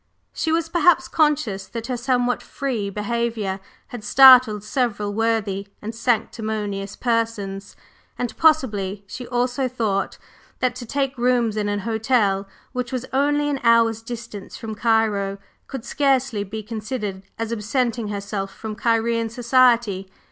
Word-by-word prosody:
She 320 - -1
was 330 0 +1
perhaps 330 -5 +3
conscious 260 - +1
that 230 -1 -6
her 250 +1 -2
somewhat 245 0 0
"free" 240 -8 -3
behavior 210 -1 -2 0.3
had 245 -3 -8
startled 255 -3 +7
several 210 -4 -1
worthy 215 -3 0
and 220 +2 -6
sanctimonious 215 -4 -2
persons; 220 -5 -2 0.4
and 245 -1 -3
possibly 210 -11 +2
she 245 +5 -8
also 250 +2 0
thought 220 -6 -1 0.4
that 255 -1 0
to 240 - -8
take 270 0 -2
rooms 240 -3 +2
in 210 -1 -1
an 205 0 -1
hotel 220 -3 +1 0.2
which 250 -2 -3
was 255 -1 -3
only 290 +2 +2
an 285 -2 -1
hour's 230 -1 +4
distance 225 -4 -8
from 225 -2 -6
Cairo, 215 -3 +1 0.3
could 265 -3 -7
scarcely 265 -7 +1
be 215 +2 -6
considered 215 -2 -4 0.2
as 225 0 -3
absenting 230 +1 -1
herself 200 -1 -4
from 220 -1 -7
Cairene 230 0 +1
society. 235 -5 +3
230 Hz, 135 wpm, -22 LUFS, 210-250 Hz, 0.4 s, startled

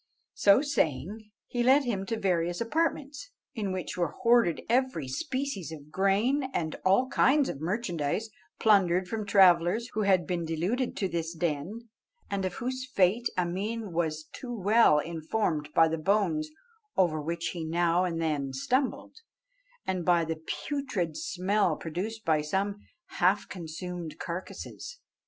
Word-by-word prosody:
So 205 +7 +5
saying, 210 - -1 0.2
he 240 - -2
led 265 +4 +5
him 200 -6 -2
to 225 - -1
various 175 -3 0
apartments, 285 +2 -1 0.2
in 210 -6 -2
which 185 -1 -4
were 175 -1 0
hoarded 235 -8 +3
every 245 - +1
species 260 - -3
of 150 -1 -10
grain, 205 - +2
and 160 -2 -1
all 195 +8 +4
kinds 280 +1 +3
of 140 - -6
merchandise, 180 +1 -2 0.3
plundered 185 -4 +4
from 215 -1 -4
travellers 190 +3 +4
who 215 - 0
had 190 -4 +3
been 175 +1 -2
deluded 180 +11 -1
to 195 - 0
this 170 -1 -3
den, 175 +8 -3 0.4
and 195 -1 -1
of 180 -1 -3
whose 255 +1 -4
fate 220 +1 +2
Ameen 195 +4 -2
was 160 -2 -1
too 250 - -7
well 210 -4 +5
informed 160 0 -1
by 165 - +6
the 160 0 -2
bones 215 - +1 0.5
over 160 -5 +2
which 170 +2 -2
he 170 -2 -5
now 170 +2 +2
and 170 -2 -1
then 145 -4 -1
stumbled, 255 - -1 0.7
and 185 -2 -1
by 170 -1 +3
the 160 0 -4 0.2
putrid 240 - -2
smell 185 0 0
produced 205 +9 -5
by 155 -2 +3
some 195 +7 -1 0.4
half 195 +2 +3
consumed 170 -1 -6
carcasses. 185 - -7
185 Hz, 145 wpm, -29 LUFS, 165-225 Hz, 0.7 s, by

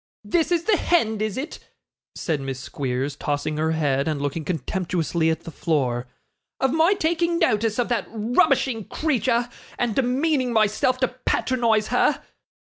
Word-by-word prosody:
'This 345 -1 +1
is 340 -1 +2
the 410 +1 +3
hend, 220 -14 +1
is 215 0 -2
it,' 290 +5 -5 0.6
said 155 -4 -2
Miss 135 -1 -4
Squeers, 135 +1 -3
tossing 150 +1 -2
her 160 +1 +1
head, 140 -3 +1
and 155 -2 -1
looking 145 +3 -2
contemptuously 170 +1 -1
at 160 0 -1
the 165 - -9
floor, 130 -7 -1 0.5
'of 265 0 +1
my 325 +5 +4
taking 340 -1 +1
notice 215 -5 +1
of 245 - +1
that 240 - 0
rubbishing 245 - +2
creature, 245 -5 0 0.3
and 240 -2 0
demeaning 260 +2 +1
myself 220 +3 +2
to 255 - +4
patronise 240 -3 0
her? - - +2
220 Hz, 150 wpm, -23 LUFS, 155-265 Hz, 0.6 s, my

